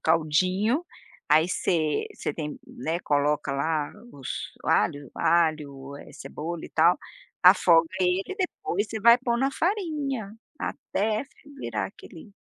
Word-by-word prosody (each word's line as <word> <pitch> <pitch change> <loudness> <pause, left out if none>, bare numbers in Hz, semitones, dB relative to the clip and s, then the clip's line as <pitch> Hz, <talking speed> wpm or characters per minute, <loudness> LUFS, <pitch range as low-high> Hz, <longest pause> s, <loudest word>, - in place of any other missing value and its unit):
caldinho, 185 - +2 0.4
aí, 160 +2 +5
você 160 -4 0
você - - -3
tem 150 -2 -5
né, 165 +2 -3
coloca 145 -1 +1
lá, 150 +2 -1 0.2
os 135 -3 -9 0.4
alho, 145 -2 +1
alho, 150 -5 0
eh, - - -13
cebola, 165 +2 -6
e - - -8
tal, 170 +3 +4 0.4
afoga 175 -3 +6
ele 180 +1 +2
e 385 - -5
depois 225 - -2
você 220 0 -4
vai 235 +2 +8
pôr 240 -1 0
na 270 +2 +2
farinha, 295 - -2 0.3
até 215 -2 -2
fer 280 +1 -20
virar 105 - -2
aquele 165 - -13
170 Hz, 135 wpm, -26 LUFS, 150-225 Hz, 0.4 s, vai